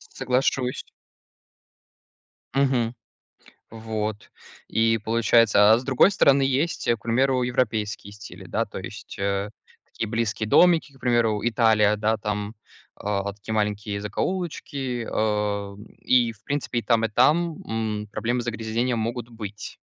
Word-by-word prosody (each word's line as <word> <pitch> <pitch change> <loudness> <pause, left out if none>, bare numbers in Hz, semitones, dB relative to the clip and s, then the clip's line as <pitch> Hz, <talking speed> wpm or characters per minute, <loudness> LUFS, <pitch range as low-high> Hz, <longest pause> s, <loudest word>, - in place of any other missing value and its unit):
Соглашусь. 125 0 0 1.7
Мгм, 130 -4 +1 0.8
вот 110 -2 -5 0.4
и 115 0 +2
получается, 110 -1 +4
а 110 - +5
с 125 - -8
другой 130 +8 +4
стороны, 140 -8 +4
есть, 135 +5 0
к - - 0
примеру, 130 +2 +2
европейские 110 -5 -1
стили, 105 0 -11
да, - - -1
то - - -8
есть, - - -9
э, 100 +1 -1 0.4
такие 110 - -5
близкие 110 -1 -2
домики 170 +2 +4
к 135 - -21
примеру: 120 -4 +2
Италия 110 -2 +3
да 110 +1 +1
там, 105 0 -4 0.5
э, 100 -1 -1
такие 110 +2 -6
маленькие 105 -1 -1
закоулочки, 135 - -3
э, 105 -2 -1 0.2
и 120 -2 +3
в 105 -1 -25
принципе, 140 -3 -2
и - - -14
там 115 +1 +2
и - - +1
там, 155 +9 +2
м, 110 -2 -3
проблемы 120 +1 -1
загрязнения 115 +1 -2
могут 115 +1 -3
быть. 105 -2 -8
115 Hz, 130 wpm, -24 LUFS, 105-125 Hz, 1.7 s, а